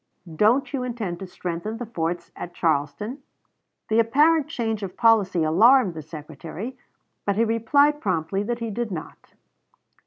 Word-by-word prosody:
"Don't 230 - +3
you 270 - -1
intend 230 -8 -4
to 190 - -7
strengthen 180 +4 -5
the 245 - -5
forts 170 -4 -3
at 175 0 -8
Charleston?" 160 - -1 0.7
The 220 +1 +2
apparent 295 +7 +4
change 225 -8 -2
of 190 -2 -6
policy 200 -7 +4
alarmed 210 +6 +5
the 160 - -6
Secretary, 160 - -8 0.5
but 200 - 0
he 230 +3 +3
replied 285 +7 +3
promptly 185 0 -1
that 235 +3 -2
he 230 -2 -4
did 235 +2 -3
not. 170 -5 -8
215 Hz, 150 wpm, -24 LUFS, 170-240 Hz, 0.7 s, alarmed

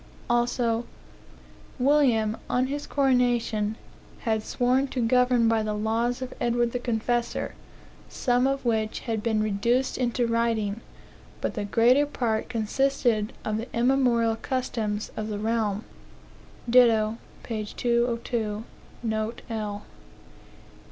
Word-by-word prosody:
Also, 240 -1 +1 0.9
"William, 250 -6 +3
on 250 +1 +2
his 285 +2 -4
coronation, 245 -5 +1 0.5
had 220 -2 0
sworn 255 +4 +1
to 260 - -4
govern 250 0 +3
by 225 -1 +3
the 215 -1 -2
laws 230 +4 0
of 255 - -6
Edward 240 0 +1
the 245 - -2
Confessor, 240 0 -1 0.6
some 250 0 +1
of 275 -1 -2
which 220 -2 0
had 225 -3 -2
been 215 -1 +1
reduced 235 +6 0
into 245 -1 +1
writing, 230 -2 0 0.6
but - - -2
the 210 -3 -3
greater 245 +7 +4
part 230 -6 -1
consisted 230 -1 +1
of 215 0 -1
the 230 +2 -4
immemorial 235 -3 +3
customs 220 -5 -2
of 215 - -3
the 210 -1 -3
realm." 215 -1 -1 0.8
Ditto, 230 -2 +4 0.2
p. 220 -2 -3
202, 235 -1 -1 0.4
note 220 0 -2
L. 210 -2 -4
235 Hz, 120 wpm, -26 LUFS, 220-250 Hz, 0.9 s, greater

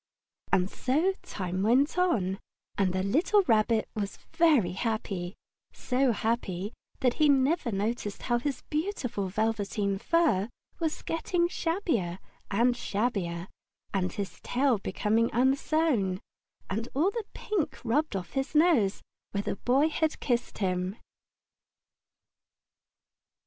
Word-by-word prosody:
And 180 0 +3
so 300 - +1
time 185 -1 -4
went 255 +8 +3
on, 215 - +1 0.4
and 195 -2 +2
the 185 +1 -1
little 340 - +3
Rabbit 220 - +2
was 205 -2 -3 0.2
very 295 - +4
happy 195 -3 -3 0.4
so 255 0 +1
happy 210 -3 -2 0.3
that 250 -2 +3
he 300 - +6
never 275 0 +3
noticed 205 +1 -2
how 240 -1 +1
his 270 0 -3
beautiful 300 - -1
velveteen 205 -1 -1
fur 240 - +2 0.3
was 320 -2 -2
getting 345 +1 0
shabbier 325 - -1 0.3
and 240 +5 +3
shabbier, 195 -7 -2 0.5
and 185 -2 0
his 190 -2 -5
tail 255 -3 +2
becoming 220 +3 +1
unsewn, 260 - +2 0.5
and 225 +5 -3
all 335 +8 +3
the 455 -1 -4
pink 345 -9 -2
rubbed 260 +2 +1
off 185 -2 -4
his 270 +3 -2
nose 300 - +4 0.3
where 200 0 -1
the - - -2
Boy 270 +8 +3
had 315 0 0
kissed 240 -3 -1
him. 185 0 -1
235 Hz, 120 wpm, -29 LUFS, 195-300 Hz, 0.5 s, he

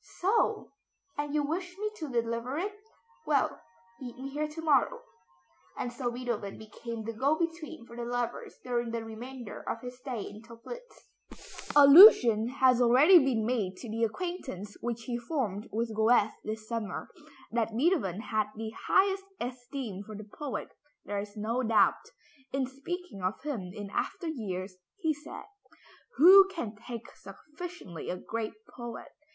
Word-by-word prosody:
"So! 405 +5 +1 0.4
And 290 0 -3
you 295 - +2
wish 355 +5 -3
me 425 +1 -2
to 310 -6 -5
deliver 235 +2 -1
it? 400 +5 -2 0.5
Well, 285 -3 +1 0.4
meet 245 -2 -8
me 265 +1 -6
here 300 +2 -2
to 305 +2 -8
morrow;" 400 - +2 0.7
and 245 - -3
so 240 0 -2
Beethoven 240 -5 -4
became 220 +1 -7
the 230 +1 -4
go 275 +7 +2
between 330 -5 -4
for 235 - -12
the 240 - -4
lovers 240 0 -3
during 240 -1 -1
the 230 0 -3
remainder 240 +1 -8
of 230 - -3
his 250 0 -8
stay 250 -5 -4
in 210 +1 -9
Töplitz. 235 - -12 0.6
Allusion 280 - +9
has 255 -1 +3
already 270 +10 +8
been 255 -6 +1
made 215 -6 -1
to 240 - -8
the 230 +1 -1
acquaintance 230 - -4
which 235 -1 -3
he 240 0 -3
formed 235 - -3
with 225 +1 -2
Goethe 220 0 +4
this 215 0 -5
summer. 230 -3 -4 0.4
That 225 -1 -1
Beethoven 250 - +1
had 215 -2 0
the 220 0 -5 0.2
highest 385 0 +3
esteem 245 -4 -5
for 215 +1 -9
the 215 - -7
poet, 280 -7 -4 0.4
there 205 0 -2
is 205 +1 -7
no 225 +4 -1
doubt. 225 -3 +3 0.4
In 270 0 0
speaking 275 - -6
of 185 +3 -1
him 225 -12 -4
in 200 +1 -7
after 360 -4 -2
years, 190 -9 -4 0.2
he 320 -6 +1
said, 295 +1 -9 0.7
"Who 380 +6 +9
can 245 - -5
thank 230 +2 -7
sufficiently 305 - -9
a 180 - -2
great 220 +3 -4
poet? 240 -1 -8
245 Hz, 155 wpm, -30 LUFS, 220-295 Hz, 0.7 s, Allusion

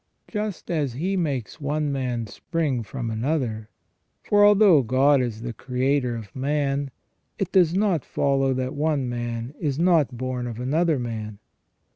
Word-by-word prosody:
Just 210 -5 -4
as 145 -7 0
He 180 +10 -1
makes 145 - -2
one 145 +1 -1
man 125 -4 -2
spring 140 +3 -2
from 115 +1 -5
another, 115 -3 -2 0.5
for 205 0 +4
although 205 -6 +6
God 135 +3 +3
is 115 -3 -3
the 120 -1 -4
Creator 125 0 0
of 110 -4 -9
man, 140 0 0 0.5
it 195 - -2
does 180 -3 +4
not 190 -8 +2
follow 135 -1 +1
that 130 0 -2
one 145 -3 0
man 120 +1 -4
is 140 -4 -1
not 160 -7 +3
born 125 0 -3
of 115 -1 -6
another 155 +5 +1
man. 110 -4 -5
135 Hz, 150 wpm, -24 LUFS, 120-155 Hz, 0.5 s, although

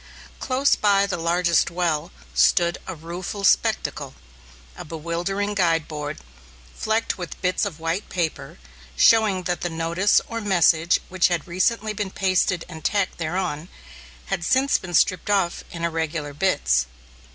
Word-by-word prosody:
Close 270 +2 +2
by 200 -1 +3
the 200 - -2
largest 170 0 +2
well 170 - -1 0.2
stood 170 - +3
a 185 - -5
rueful 175 +5 -6
spectacle, - - +1 0.6
a - - -8
bewildering 170 +6 -3
guide 165 -5 +1
board, 150 -2 -5 0.6
flecked 220 -2 -1
with 175 - -7
bits 185 +3 +1
of 175 -6 -5
white 165 +5 -3
paper, 170 -4 -3 0.4
showing 205 - +4
that 175 0 -2
the 175 - -1
notice 165 +4 +2
or 230 0 -4
message 175 -4 +3
which 185 -1 +3
had 175 -4 -2
recently 210 +5 0
been 205 -1 -3
pasted 185 -2 0
and 160 -3 -10
tacked 200 -4 0
thereon 170 -1 -3 0.6
had 175 - -3
since 260 +8 +2
been 175 -2 -5
stripped 185 +4 +2
off 195 -4 +1
in 170 -1 -7
irregular 160 -3 -3
bits. 65 - +1
175 Hz, 140 wpm, -23 LUFS, 165-195 Hz, 0.6 s, showing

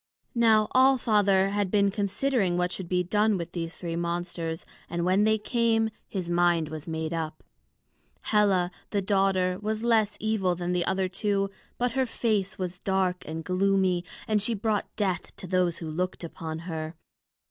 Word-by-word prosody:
Now 220 -3 +4
All 265 +1 +5
Father 200 -5 +3
had 200 -1 0
been 200 0 +3
considering 200 -1 0
what 180 0 0
should 185 -3 -5
be 180 -1 +2
done 210 +3 +2
with 170 -1 -5
the 170 -2 -3
three 165 0 -5
monsters, 170 -1 -3 0.2
and 170 0 -1
when 190 +3 +3
they 220 0 +4
came, 225 0 +1 0.2
his 185 -4 -4
mind 175 -2 +2
was 155 0 -7
made 160 0 -3
up. 160 -2 -4 0.8
Hela, 195 -4 +2 0.2
the 200 -2 0
daughter, 190 -2 +2
was 215 +1 -2
less 220 -3 +2
evil 205 -5 +1
than 175 0 -3
the 180 -1 +1
other 190 0 0
two, 195 +1 -1 0.3
but 245 0 0
her 260 +1 0
face 200 -5 -1
was 180 -2 -4
dark 190 -2 0
and 160 +1 -4
gloomy, 185 -1 +2 0.2
and 215 -1 +2
she 225 +3 0
brought 210 0 -1
death 190 -5 -2
to - - -8
those 180 -2 +1
who 165 - -6
looked 180 +3 -2
upon 160 -1 -5
her. 160 -1 -4
190 Hz, 170 wpm, -27 LUFS, 175-210 Hz, 0.8 s, All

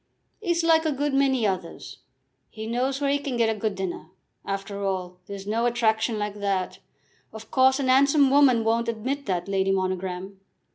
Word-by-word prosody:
"'E's 345 -4 0
like 325 -1 +4
a 315 - 0
good 290 +1 -1
many 270 -4 +2
others. 185 -4 -4 0.5
He 220 0 -8
knows 255 +4 -1
where 280 -1 +1
he 285 - +1
can 280 -4 -4
get 225 -1 +2
a - - -11
good 215 -1 -1
dinner. 190 -4 -5 0.4
After 195 0 -4
all, 185 -2 -3
there's 200 -1 -7
no 225 +3 0
attraction 225 -1 +1
like 210 0 -4
that. 195 -2 -2 0.5
Of 220 0 -11
course, 260 +1 +4
a - - -1
'ansome 275 +2 +4
woman 270 -5 +5
won't 230 +1 +1
admit 255 +5 -3
that, 180 -2 -1
Lady 195 -1 0
Monogram." 185 0 -2
225 Hz, 180 wpm, -25 LUFS, 195-270 Hz, 0.5 s, woman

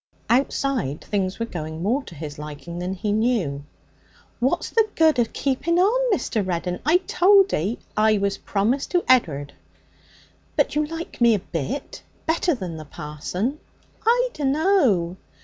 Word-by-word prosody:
Outside 255 - 0
things 195 -2 -1
were 230 - -2
going 160 -5 -6
more 240 +8 +1
to 170 - -11
his 150 -1 -7
liking 150 +3 -7
than 180 +2 -3
he 205 +2 -2
knew. 210 - 0 0.8
'What's 265 +8 0
the 445 -1 +3
good 315 -5 +4
of 230 -1 +1
keeping 285 +5 0
on, 475 +7 +3
Mr. 225 - 0
Reddin? 180 -1 -2
I 315 +5 +5
told 390 +1 +5
'ee 200 +10 0 0.2
I 215 0 +4
was 200 0 -1
promised 225 +7 0
to 355 - +2
Ed'ard.' 145 - +2 1.0
'But - - +2
you 300 0 +1
like 330 -4 -7
me 235 -2 +6
a - - -1
bit? 185 - -5 0.2
Better 325 0 +1
than 180 -8 -6
the 155 - -8
parson?' 180 - -4 0.4
'I - - +3
dunno.' 270 - +2
225 Hz, 150 wpm, -23 LUFS, -, 1.0 s, me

